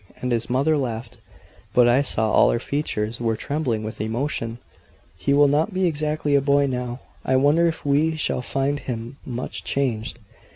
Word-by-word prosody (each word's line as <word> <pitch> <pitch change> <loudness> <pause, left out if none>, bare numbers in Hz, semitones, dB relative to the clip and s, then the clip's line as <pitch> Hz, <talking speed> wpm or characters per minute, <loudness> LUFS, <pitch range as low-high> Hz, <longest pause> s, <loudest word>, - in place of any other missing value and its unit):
And 125 - -2
his 115 -1 -1
mother 140 +5 +2
laughed; 115 -3 -4 0.6
but 125 -1 +6
I 120 +3 +4
saw 110 -5 +1
all - - +5
her - - +2
features 115 -4 -2
were 115 -1 +1
trembling 125 -3 -2
with 110 -1 -5
emotion. 115 0 -2 0.6
"He 90 +10 -1
will 145 +1 +6
not 155 +8 +1
be 190 0 +2
exactly 150 -2 0
a 140 - +5
boy 140 0 +3
now. 125 -1 -3 0.2
I 130 - +1
wonder 145 +6 +4
if 165 - -3
we 150 +3 +2
shall 155 -4 -1
find 135 +3 -1
him 120 0 -6
much 125 -1 -4
changed." 120 -5 -1
135 Hz, 175 wpm, -23 LUFS, 115-145 Hz, 0.6 s, but